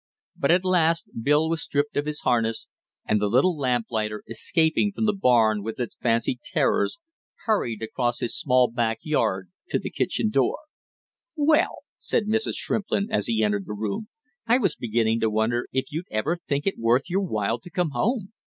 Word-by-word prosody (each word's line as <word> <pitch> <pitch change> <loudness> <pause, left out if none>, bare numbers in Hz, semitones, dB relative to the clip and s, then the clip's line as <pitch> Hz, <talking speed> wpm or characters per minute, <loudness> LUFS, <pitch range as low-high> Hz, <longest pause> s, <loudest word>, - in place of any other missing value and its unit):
But 140 - 0
at 180 +2 +4
last 170 -2 +2
Bill 150 +5 +3
was 165 -1 -1
stripped 145 +1 -1
of 145 +1 -1
his 150 -1 -3
harness, 115 -2 0 0.4
and 105 -1 +1
the 105 - +2
little 135 - +3
lamplighter, 115 -6 -1
escaping 160 - +1
from 220 - -2
the 210 - +3
barn 115 - +3
with 110 +5 -6
its 120 - -3
fancied 115 +1 0
terrors, - - +1 0.5
hurried 120 - 0
across 120 +2 -1
his 120 - -1
small 130 -6 +3
back 115 -1 -1
yard 95 - 0 0.2
to - - +1
his - - -6
kitchen 105 - -1
door. 130 +1 +2 0.8
"Well!" 305 +1 +2 0.2
said 215 - 0
Mrs. 220 +1 0
Shrimplin, 210 0 -1
as 215 - +1
he 110 -1 +1
entered 100 -2 0
the 105 - -4
room. 105 - -3 0.4
"I 235 +2 +5
was 195 - +1
beginning 115 -1 0
to 110 - +1
wonder 110 +3 0
if 130 0 -2
you'd 160 +4 -4
ever 150 +11 -1
think 145 0 -1
it 195 - -1
worth 120 +3 +2
your 190 +2 0
while 115 - -1
to 175 - -12
come 175 -2 -1
home!" 215 - -1
130 Hz, 180 wpm, -25 LUFS, 115-175 Hz, 0.8 s, I